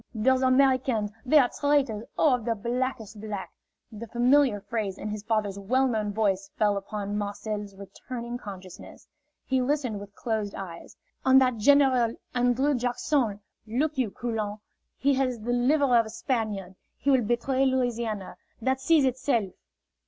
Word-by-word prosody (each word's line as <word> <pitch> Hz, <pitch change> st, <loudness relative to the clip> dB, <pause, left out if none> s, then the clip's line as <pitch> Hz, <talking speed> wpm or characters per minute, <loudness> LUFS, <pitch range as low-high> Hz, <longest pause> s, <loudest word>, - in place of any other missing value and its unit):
"Those 260 Hz, +4 st, +3 dB
Americans, 255 Hz, -5 st, +3 dB
they 285 Hz, +4 st, +4 dB
are 255 Hz, -4 st, +5 dB
traitors, 275 Hz, -7 st, +1 dB
oh, 300 Hz, -4 st, +4 dB
of 250 Hz, -2 st, -1 dB
the 230 Hz, -1 st, 0 dB
blackest 235 Hz, -1 st, -3 dB
black!" 210 Hz, -3 st, -5 dB, 0.4 s
The 225 Hz, +1 st, -8 dB
familiar 245 Hz, -1 st, +3 dB
phrase 200 Hz, -1 st, -3 dB
in 215 Hz, -, -5 dB
his 210 Hz, 0 st, -4 dB
father's 210 Hz, -2 st, -1 dB
well 255 Hz, +7 st, +2 dB
known 215 Hz, -4 st, -1 dB
voice 195 Hz, -2 st, 0 dB
fell 210 Hz, -1 st, +3 dB
upon 205 Hz, +1 st, -4 dB
Marcel's 205 Hz, 0 st, -4 dB
returning 235 Hz, +5 st, -7 dB
consciousness. 185 Hz, -4 st, -11 dB, 0.4 s
He 260 Hz, -1 st, +1 dB
listened 250 Hz, -5 st, -1 dB
with 200 Hz, 0 st, -11 dB
closed 220 Hz, -4 st, -2 dB
eyes. 180 Hz, -4 st, -9 dB, 0.3 s
"And 265 Hz, 0 st, +6 dB
that 255 Hz, -3 st, +2 dB
General 255 Hz, -1 st, +4 dB, 0.2 s
An 245 Hz, 0 st, +2 dB
drrew 275 Hz, +4 st, +1 dB
Jack 245 Hz, -1 st, -1 dB
son, 230 Hz, -9 st, 0 dB, 0.3 s
look 285 Hz, +8 st, 0 dB
you, 255 Hz, -5 st, 0 dB
Coulon, 215 Hz, -2 st, -3 dB, 0.4 s
he 280 Hz, +1 st, +2 dB
has 255 Hz, -3 st, 0 dB
the 240 Hz, +3 st, -2 dB
liver 260 Hz, +1 st, +3 dB
of 230 Hz, -2 st, +4 dB
a -, -, -8 dB
Spaniard. 220 Hz, -6 st, -3 dB, 0.2 s
He 280 Hz, -, +1 dB
will 260 Hz, -2 st, +4 dB
betray 240 Hz, +4 st, 0 dB
Louisiana. 235 Hz, -6 st, -2 dB, 0.2 s
That 260 Hz, +3 st, 0 dB
sees 315 Hz, -1 st, +4 dB
itself!" 240 Hz, -6 st, 0 dB
235 Hz, 160 wpm, -27 LUFS, 210-260 Hz, 0.4 s, And